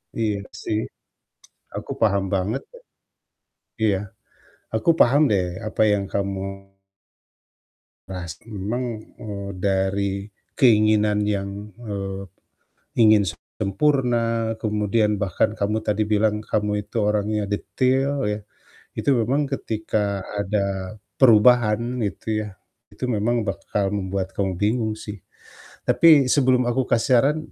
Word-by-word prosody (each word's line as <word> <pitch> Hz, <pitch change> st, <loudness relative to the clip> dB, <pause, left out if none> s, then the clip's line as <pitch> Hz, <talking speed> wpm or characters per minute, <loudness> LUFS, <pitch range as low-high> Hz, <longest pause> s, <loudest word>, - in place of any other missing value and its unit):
Iya 110 Hz, -3 st, 0 dB, 0.3 s
sih, 105 Hz, -, 0 dB, 1.0 s
aku -, -, -6 dB
paham 100 Hz, -3 st, +3 dB
banget 100 Hz, +7 st, 0 dB
loh. 485 Hz, -, -15 dB, 1.0 s
Iya, 105 Hz, -3 st, +3 dB, 0.8 s
aku 110 Hz, +7 st, +1 dB
paham 140 Hz, +5 st, +5 dB
deh 95 Hz, -3 st, +2 dB, 0.2 s
apa 110 Hz, -, -2 dB
yang 100 Hz, -1 st, +1 dB
kamu 100 Hz, -1 st, -1 dB, 1.7 s
pasti 90 Hz, 0 st, -7 dB
memang, 110 Hz, +2 st, -4 dB, 0.2 s
eee, 100 Hz, -2 st, -6 dB
dari 100 Hz, +1 st, 0 dB, 0.3 s
keinginan 105 Hz, -4 st, +4 dB
yang, 100 Hz, 0 st, -4 dB
eee, 100 Hz, -4 st, -5 dB, 0.8 s
ingin 110 Hz, -2 st, +6 dB, 0.3 s
sempurna 115 Hz, 0 st, +1 dB
kemudian 105 Hz, 0 st, +1 dB
bahkan 100 Hz, +2 st, 0 dB
kamu 105 Hz, +2 st, 0 dB
tadi 110 Hz, 0 st, 0 dB
bilang, 105 Hz, 0 st, +1 dB
kamu 105 Hz, -1 st, -1 dB
itu 115 Hz, -, -3 dB
orangnya 105 Hz, 0 st, 0 dB
detail 130 Hz, +6 st, 0 dB
ya. 105 Hz, 0 st, -3 dB, 0.5 s
Itu 140 Hz, -, +2 dB
memang 135 Hz, +6 st, +1 dB
ketika 105 Hz, -5 st, -2 dB, 0.2 s
ada 100 Hz, -1 st, -2 dB, 0.2 s
perubahan 120 Hz, 0 st, +5 dB
itu 110 Hz, 0 st, -2 dB
ya, 95 Hz, -, -15 dB, 0.3 s
itu -, -, -7 dB
memang 115 Hz, 0 st, 0 dB
bakal 100 Hz, 0 st, -2 dB
membuat 95 Hz, -1 st, -3 dB
kamu 95 Hz, -2 st, -2 dB
bingung 110 Hz, +3 st, 0 dB
sih. 105 Hz, -3 st, -8 dB, 0.7 s
Tapi 155 Hz, -6 st, +6 dB
sebelum 130 Hz, -2 st, +3 dB
aku 125 Hz, +2 st, +1 dB
kasih 120 Hz, +1 st, +2 dB
saran, 150 Hz, +3 st, +2 dB
105 Hz, 110 wpm, -23 LUFS, 100-115 Hz, 1.7 s, ingin